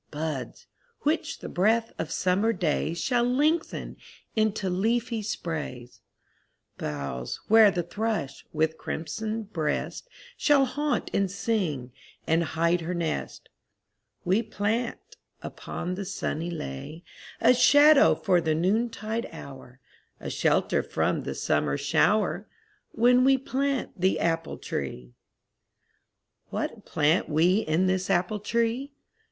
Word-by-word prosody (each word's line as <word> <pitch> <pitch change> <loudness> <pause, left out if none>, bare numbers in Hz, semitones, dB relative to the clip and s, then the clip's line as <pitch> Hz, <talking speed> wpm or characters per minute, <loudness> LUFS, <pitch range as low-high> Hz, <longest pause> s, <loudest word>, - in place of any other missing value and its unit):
Buds, 150 -4 -5 0.4
which 310 +3 -1
the - - -6
breath 225 +5 +1
of - - -3
summer 195 +5 +1
days 170 -2 -1
Shall 245 -2 +1
lengthen 295 +7 0 0.4
into 215 -3 +1
leafy 225 +5 0
sprays; 150 - -5 0.8
Boughs 70 -4 -4
where 220 -1 +8
the 180 -3 -1
thrush, 200 -7 -3
with 160 0 0
crimson 215 +8 -4
breast, 175 - -3 0.3
Shall 285 -3 +4
haunt 290 +3 -2
and 200 -1 +1
sing 185 - -2 0.3
and 165 +1 +2
hide 170 +2 +1
her 175 +2 -3
nest; 165 -2 -3 0.8
We 190 +5 +3
plant, 225 +2 -3 0.3
upon 180 - -5
the 195 +2 -4
sunny 170 -3 -3
lea, 155 - -6 0.4
A 235 +2 +6
shadow 290 +4 +6
for 180 -3 +2
the 160 -1 +1
noontide 220 +5 -1
hour, 130 -2 -11 0.4
A - - -5
shelter - - +2
from - - -1
the - - -4
summer 70 - 0
shower, - - +1 0.4
When 245 +2 +4
we 270 +1 +5
plant 270 -5 -2
the 190 +1 +2
apple 165 -1 -1
tree. 60 -3 -5 1.4
What - - -4
plant 155 +4 +1
we 165 +5 +3
in 170 -2 +1
this 185 0 0
apple 190 +3 +1
tree? 235 +6 -1
190 Hz, 120 wpm, -27 LUFS, 160-230 Hz, 1.4 s, where